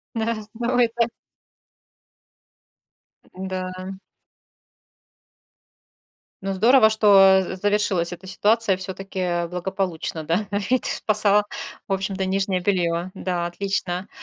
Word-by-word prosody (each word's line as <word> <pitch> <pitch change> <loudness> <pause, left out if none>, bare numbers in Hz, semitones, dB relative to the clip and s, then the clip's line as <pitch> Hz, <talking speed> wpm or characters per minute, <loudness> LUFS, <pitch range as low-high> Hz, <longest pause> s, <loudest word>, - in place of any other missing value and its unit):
Да. 220 -1 -2
Но 240 +2 -1
это 235 0 +2 2.3
М-да. 185 0 -5 2.5
Ну, 195 - -1
здорово, 225 +2 +5
что 195 -3 +6
з 185 +1 -5
завершилась 205 -4 +1
эта 190 +2 -9
ситуация 210 +1 +2
всё-таки 185 -2 -3
благополучно, 180 -2 -3
да. 180 +7 0 0.2
Ведь 255 - +3
ты - - -1
спасала, 210 -1 +3 0.4
в 195 - -3
общем-то, 190 0 -1
нижнее 190 -1 0
белье. 175 -1 0
Да, 175 -2 -2
отлично. 185 +1 -3
195 Hz, 95 wpm, -23 LUFS, 185-210 Hz, 2.5 s, что